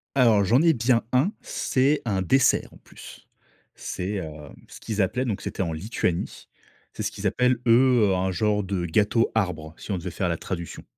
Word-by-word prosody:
Alors, 115 -6 +4
j'en 120 +8 +4
ai 165 -1 +5
bien 115 0 +2
un. 135 +10 +2
C'est 135 +3 0
un 95 -4 0
dessert, 130 +9 +2
en - - -15
plus. - - -14 0.5
C'est, 90 +2 -5
hem, 75 -4 -8
ce - - -12
qu'ils 110 -2 -2
appelaient 125 +8 0
donc 110 -6 -3
c'était - - -3
en 85 -3 -3
Lituanie. 85 0 -3 0.4
C'est - - -6
ce - - -1
qu'ils - - -8
appellent, 125 0 +2
eux, 120 -4 +5
un 95 +1 0
genre 105 +3 0
de 95 -2 -2
gâteau 105 +6 +2
arbre 90 -7 -2
si - - -8
on 95 - 0
devait 90 +1 -5
faire 90 +1 -2
la 85 - -1
traduction. 85 -1 -6
105 Hz, 190 wpm, -25 LUFS, 90-125 Hz, 0.5 s, ai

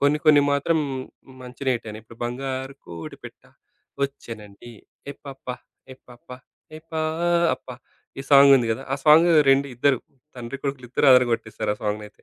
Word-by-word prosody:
కొన్ని 145 +1 +2
కొన్ని 150 -1 +7
మాత్రం 150 +4 +1 0.6
మంచినే 125 +1 -3
హిట్టయిని. 110 -2 -9
ఇప్పుడు 115 +1 -17
బంగారు 130 +2 -4
కోడి 85 -1 -9
పిట్ట - - -12 0.6
వచ్చెనండి 115 -5 -10 0.4
ఏయ్ 140 - -12
పాప! 135 -1 -11 0.5
ఏయ్ 130 - -17
పాప! 120 -1 -17 0.5
ఏయ్, 155 +1 -12
పాప 165 0 0 0.5
ఈ - - -6
సాంగుంది 140 -3 +7
గదా! 110 - -6
ఆ - - +3
సాంగు 160 +3 +6 0.2
రెండ్ 135 +1 +3
ఇద్దరు 130 +2 +2 0.4
తండ్రి, 120 +2 -6
కొడుకులిద్దరూ 135 -1 -2
ఆదరగొట్టేసారు, 120 -4 +1
ఆ - - -29
సాంగునైతే. 105 0 -5
135 Hz, 135 wpm, -23 LUFS, 120-140 Hz, 0.6 s, కొన్ని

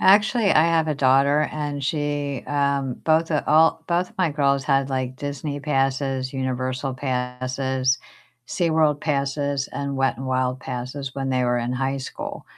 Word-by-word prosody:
Actually, 205 +2 +4
I 155 - +5
have 165 -1 +2
a 150 - +1
daughter 140 +3 +3
and 145 -2 -3
she, 145 -2 -2
um, 140 -3 0
both 160 +1 +2
of 150 - +1
all 160 +1 +4
both 175 +1 0
of - - -26
my 180 -4 +2
girls 140 -2 +1
had, 135 -1 +1
like, 130 -1 -2
Disney 145 +1 -4
passes, 135 -2 -1
Universal 130 0 -2
passes, 130 0 -1 0.5
SeaWorld 160 -4 +1
passes, 140 -1 -1
and 140 -1 -3
Wet 135 -3 +1
'n 130 - -5
Wild 130 0 0
passes 130 +2 -5
when 135 -1 -2
they 125 -1 +1
were 120 0 +1
in 120 +1 -2
high 135 +1 -1
school. 130 - -6
140 Hz, 160 wpm, -23 LUFS, 130-150 Hz, 0.5 s, I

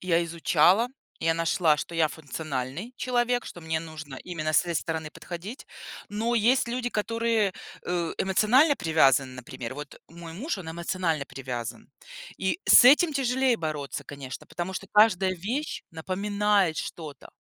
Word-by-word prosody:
Я 170 -2 +1
изучала. 170 +6 +3 0.3
Я 165 0 +2
нашла, 165 -1 +2
что 170 - -6
я- 165 -2 +3
функциональный 150 - -5
человек, 245 -1 0
что 175 - -9
мне 160 0 -1
нужно 155 -4 -9
именно 155 -3 -3
с - - +5
этой 170 -1 -4
стороны 160 -1 -2
подходить. 185 - -8 0.4
Но 225 +3 -1
есть 240 +4 +3
люди, 245 +1 -2
которые, 230 -1 0 0.3
э, 175 -2 -1
эмоционально 245 - +4
привязаны, 140 - +3
например. 125 0 -7
Вот 145 0 -9
мой 165 0 -10
муж- 225 - -3
он 175 -4 -8
эмоционально 170 -3 -1
привязан. 125 -4 -6 0.5
И 190 - -1
с - - +9
этим 300 +5 +7
тяжелее 260 -2 +2
бороться, 155 -5 -4
конечно, 140 -2 -8
потому 175 +2 -5
что 195 +1 -6
каждая 195 -3 +4
вещь 245 - -3
напоминает 195 +1 +1
что-то. 155 -5 -7
175 Hz, 145 wpm, -27 LUFS, 155-220 Hz, 0.5 s, с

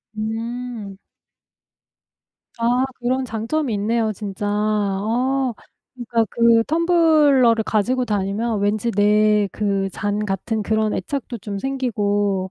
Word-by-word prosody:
음. 220 +1 -3 0.6
음. - - -25 1.6
아. 245 +3 +2 0.2
그런 255 +2 0
장점이 235 +4 -2
있네요 220 +2 0
진짜. 205 0 -5
어 215 +5 0 0.4
그러니까 235 -2 0
그 230 -1 +4
텀블러를 305 -8 +4
가지고 245 +5 +1
다니면 210 +1 -1
왠지 210 +3 0
내 210 0 +3
그 200 -2 -1
잔 205 +1 -2
같은 210 +2 -2
그런 220 0 0
애착도 265 -4 -4
좀 200 -1 -5
생기고 205 -7 -1
220 Hz, 215 characters per minute, -21 LUFS, 205-245 Hz, 1.6 s, 그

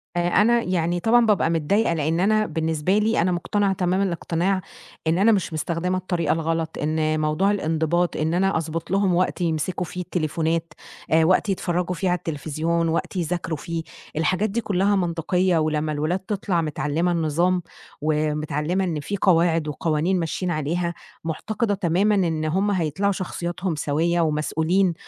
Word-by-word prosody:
آآ، 175 0 +1
أنا 230 +6 +4
يعني 175 -1 0
طبعًا 230 +5 +4
بابقى 210 -6 +2
متضايقة، 170 +5 +1
لإن 160 +1 0
أنا 215 +3 +3
بالنسبة 160 +3 0
لي 215 0 +2
أنا 180 +2 +2
مقتنعة 195 +3 0
تمام 185 +1 0
الإقتناع 180 +1 0 0.5
إن 165 +2 +2
أنا 220 +4 +5
مش 190 -5 0
مستخدمة 170 +3 -1
الطريقة 175 -4 0
الغلط، 165 0 -2
إن 155 +1 0
موضوع 155 +6 +1
الإنضباط، 165 -1 0
إن 155 +1 0
أنا 195 +1 +2
أضبط 165 +1 -4
لهم 195 -2 +2
وقت 180 +1 0
يمسكوا 170 +2 -1
فيه 180 +2 -6
التليفونات 165 -1 -1 0.4
آآ، 160 0 +5
وقت 185 +5 +3
يتفرّجوا 180 -1 -1
في 190 - -1
على 180 0 +2
التليفزيون 165 +2 -1
وقت 165 +4 -2
يذاكروا 170 -2 -2
فيه، 165 +2 -4 0.3
الحاجات 185 +7 +1
دي 230 +4 -1
كلّها 200 0 +1
منطقيّة 180 0 +1
ولمّا 155 -1 0
الولاد 155 +5 -1
تطلع 190 -3 -1
متعلّمة 155 +2 -1
النظام، 170 +2 +1 0.4
ومتعلّمة 150 +3 0
إن 170 -5 -1
في 200 +8 -3
قواعد 165 -4 +3
وقوانين 160 +4 0
ماشيين 175 +2 -2
عليها، 170 +3 -1 0.3
معتقدة 205 +7 -2
تمامًا 195 +3 +2
إن 165 -5 0
هُم 190 +6 +1
هيطلعوا 185 +2 0
شخصياتهم 180 -2 -3
سويّة 160 +4 +1
ومسؤولين 160 +4 +1
170 Hz, 155 wpm, -23 LUFS, 160-185 Hz, 0.5 s, أنا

